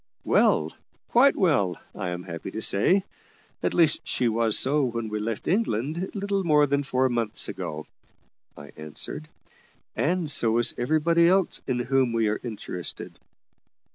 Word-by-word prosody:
"Well; - - +3 0.4
quite 270 +4 +5
well, 140 - +1
I 95 -3 -4
am 90 0 -5
happy 85 -1 -7
to 110 - -6
say. 185 - +3 0.6
At - - -1
least, 165 -3 +3
she 125 - 0
was 115 -1 +1
so 145 +2 +2
when 115 -3 -2
we 105 0 -3
left 110 0 -4
England, 165 - -1
little 200 -1 -1
more 150 -3 +4
than 140 0 0
four 130 -1 +1
months 115 -3 -1
ago," 75 0 -6 0.7
I 75 -1 -11
answered; 75 0 -6 0.7
"and 170 -1 0
so 115 -6 +3
was 120 +1 +2
everybody 160 +6 +2
else 190 0 +2
in 130 -2 0
whom 125 0 +1
we 115 -1 +1
are 105 - -2
interested." 105 -6 -6
125 Hz, 150 wpm, -25 LUFS, 110-165 Hz, 0.7 s, quite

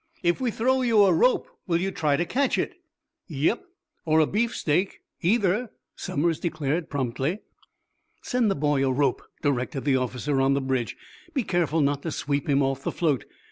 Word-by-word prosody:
"If 175 +6 +1
we 255 - +1
throw 260 +4 +1
you 230 -4 +5
a 190 -3 +5
rope, 250 +10 +3 0.2
will 170 -2 +2
you 190 +2 -1
try 150 -5 +1
to 175 - 0
catch 265 +8 +1
it?" - - -1 0.5
"Yep, 160 - 0 0.4
or 160 -1 +3
a 155 - +5
beefsteak, 200 -4 0 0.2
either," 210 +4 +2 0.3
Somers 160 +2 -1
declared, 155 -1 -2
promptly. 135 - -2 0.8
"Send 245 -3 +1
the 195 - +1
boy 145 -1 +1
a 135 - +2
rope," 135 -1 +1 0.2
directed 135 -1 -1
the 135 -2 +3
officer 130 +2 -1
on 135 +1 +3
the - - +1
bridge. 130 -3 -2 0.4
"Be 265 - +1
careful 170 -5 +1
not 140 0 +1
to 165 - -4
sweep 145 0 -2
him 140 0 +3
off 135 0 -1
the - - -2
float. 150 - 0
155 Hz, 180 wpm, -26 LUFS, 140-195 Hz, 0.8 s, you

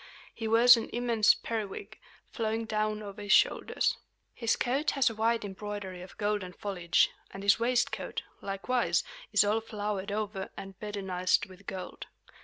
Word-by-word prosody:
He 225 - -4
wears 235 +2 +8
an 225 - -4
immense 235 -3 +4
periwig, 225 - -5 0.3
flowing 225 0 -1
down 215 0 -1
over 205 0 -8
his 205 -1 -3
shoulders. - - +3 0.4
His 230 -2 +1
coat 270 +5 0
has 260 -4 +4
a - - -6
wide 225 0 +1
embroidery 200 -2 -6
of 180 - -12
golden 205 -3 -1
foliage; 180 -4 +1 0.2
and 195 - -8
his 200 +1 +5
waistcoat, 245 +1 0 0.2
likewise, 200 +6 0 0.3
is - - +5
all 210 +2 +1
flowered 210 -2 -3
over 205 -2 -3
and 195 0 -7
bedizened 190 -3 0
with 190 +1 -16
gold. 185 -1 -6
210 Hz, 150 wpm, -30 LUFS, 195-225 Hz, 0.4 s, wears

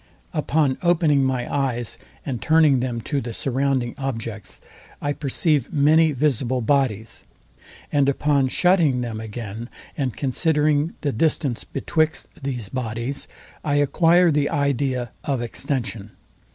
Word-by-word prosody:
Upon 150 -3 +1
opening 165 -5 +3
my 130 -2 0
eyes, 125 -5 -1 0.3
and 130 -6 -3
turning 155 -4 +4
them 120 -2 -2
to 140 +4 -2
the 115 0 -6
surrounding 135 -2 0
objects, 115 -6 -4 0.4
I 145 0 -1
perceive 145 -1 +1
many 155 +2 +4
visible 130 -3 0
bodies; 115 -4 0 0.7
and 140 -1 +3
upon 140 -1 +2
shutting 160 -4 +3
them 115 -3 -4
again, 110 +1 -6 0.3
and 135 -5 -2
considering 150 +2 +1
the 145 - 0
distance 140 -1 0
betwixt 155 +3 -1
these 125 -6 -3
bodies, 120 +2 -3 0.4
I 145 -2 0
acquire 165 +4 +4
the 145 -1 +1
idea 135 -3 0
of 140 -3 -1
extension. 115 -3 -3
135 Hz, 125 wpm, -23 LUFS, 120-150 Hz, 0.7 s, turning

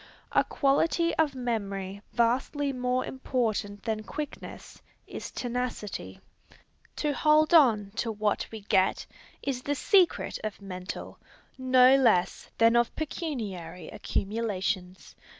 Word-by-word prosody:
A - - +4
quality 330 +4 +1
of 305 -4 +2
memory 200 -5 -3
vastly 265 +4 +1
more 250 0 0
important 220 -6 -2
than 220 -1 -2
quickness, 295 +7 -8 0.2
is - - -7
tenacity. 245 -4 -4 0.8
To 295 -1 -1
hold 305 +2 +3
on 225 -11 +5
to 230 -1 -1
what 210 -1 -1
we 220 -1 -7
get, 190 -1 +1 0.4
is 260 -3 -2
the 285 +2 -1
secret 370 +4 +2
of 215 -2 -4
mental, 185 -1 -7 0.4
no 255 0 +5
less 225 -9 +2
than 230 +1 +5
of 235 -1 +2
pecuniary 205 - -5
accumulations. 195 -3 -3
235 Hz, 115 wpm, -28 LUFS, 205-275 Hz, 0.8 s, on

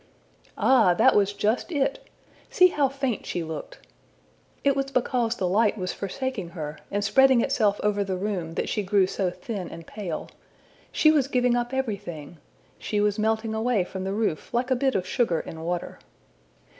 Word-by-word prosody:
Ah, 215 -9 +4
that - - +5
was 200 -1 +3
just 215 - -1
it! 300 - -1 0.5
See 365 -1 +6
how 285 -5 +1
faint 270 -4 -2
she 175 - -2
looked! 160 -1 -7 0.9
It 280 -1 +3
was 275 0 -1
because 245 -3 0
the 185 - -1
light 210 +4 +2
was 185 -2 -3
forsaking 205 -1 -4
her, 150 -1 -5
and 205 +1 -1
spreading 260 +4 +5
itself 215 -7 +1
over 205 -1 +1
the 190 -2 -3
room, 180 -4 -3
that - - -1
she 210 - -1
grew 195 0 +3
so 185 0 -1
thin 180 +2 -6
and 165 - -10
pale! 185 -6 -5 0.6
She 310 - +5
was 290 -4 +2
giving 250 -2 +2
up 240 0 -1
everything! 195 - -4 0.4
She 210 - -2
was 210 +1 +1
melting 220 +1 0
away 220 -2 +1
from 185 +1 -6
the 195 +1 -2
roof 205 -7 -2
like 245 +2 -1
a - - +5
bit 265 +1 +1
of 185 - 0
sugar 185 -4 +1
in 160 - -8
water. 175 +1 -4
210 Hz, 180 wpm, -25 LUFS, 185-255 Hz, 0.9 s, See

